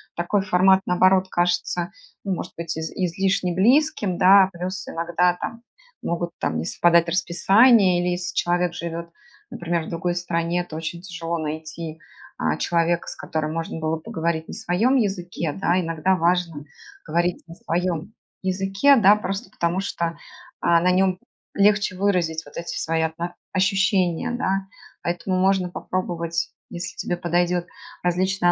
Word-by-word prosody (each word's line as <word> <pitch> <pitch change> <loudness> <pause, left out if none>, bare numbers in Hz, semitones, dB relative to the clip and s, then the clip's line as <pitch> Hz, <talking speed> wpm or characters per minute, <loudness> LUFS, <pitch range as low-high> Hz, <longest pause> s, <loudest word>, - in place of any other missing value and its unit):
такой 175 +4 0
формат, 190 0 +4
наоборот, 185 +1 +4
кажется, 175 0 0 0.3
ну, 195 - -1
может - - -5
быть 165 -1 -4
из 160 0 -4
излишне 185 0 0
близким, 225 - +2
да. 190 +1 +7
Плюс 185 +2 -5
иногда 175 +1 +1
там 230 0 -5 0.4
могут, 170 0 -2
там, 80 - -1
не 80 - -3
совпадать 170 - +3
расписания 185 +3 +4
или, 180 - 0
если 175 0 -3
человек 175 0 +1
живет, 170 0 -5 0.4
например, 170 -1 -2
в - - -8
другой 175 +1 -2
стране, 175 0 -1
то 160 - -9
очень 165 +2 -5
тяжело 170 -2 -4
найти, 155 +1 -5 0.4
а, - - 0
человека, 170 0 0
с - - -6
которым 155 -1 -3
можно 165 0 -4
было 160 0 -1
поговорить 160 0 -3
на - - -6
своем 225 +10 +1
языке, 180 - -2
да. 185 0 +1
Иногда 165 +2 +1
важно 170 -3 0 0.4
говорить 175 +1 0
на 165 - -11
своем 175 +3 -2 0.3
языке, 195 +8 +3
да, 205 -2 +7
просто 195 +3 -4
потому 170 +2 -1
что, 170 -4 -3 0.4
а, 170 -1 +3
на 180 +1 +3
нём 185 0 +2 0.3
легче 205 -1 +3
выразить 180 -5 0
вот 145 - -13
эти 170 0 -4
свои 160 0 0
отно 170 +2 -3 0.2
ощущения, 195 +1 +1
да. 195 -5 -1 0.4
Поэтому 175 +2 -1
можно 190 -1 +2
попробовать, 170 -2 -3 0.2
если 175 +1 -6
тебе 175 - -2
подойдет, 175 0 0 0.4
различные 180 0 +2
175 Hz, 145 wpm, -23 LUFS, 170-190 Hz, 0.4 s, да